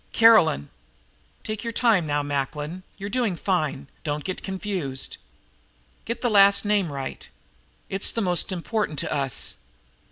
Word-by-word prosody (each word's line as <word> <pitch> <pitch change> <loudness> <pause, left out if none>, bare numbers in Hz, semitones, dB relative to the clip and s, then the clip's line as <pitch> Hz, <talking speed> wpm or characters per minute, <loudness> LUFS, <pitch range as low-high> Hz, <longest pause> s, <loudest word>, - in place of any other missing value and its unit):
"Caroline." 220 - +5 0.7
"Take 215 +1 -4
your 230 - -2
time 220 -9 +3
now, 145 0 0
Macklin, 145 +4 -3 0.2
you're 200 - -5
doing 220 -3 0
fine. 155 -7 -1 0.2
Don't 150 -2 -2
get 185 - -4
confused. 185 -9 -3 0.9
Get 235 +1 -4
the 250 - +1
last 200 0 +6
name 205 -6 +1
right. 135 -1 -6 0.6
It's 195 +1 -2
the - - -2
most 180 -2 +2
important 185 -2 -2
to - - -1
us." 135 -3 -1
185 Hz, 135 wpm, -25 LUFS, 145-210 Hz, 0.9 s, last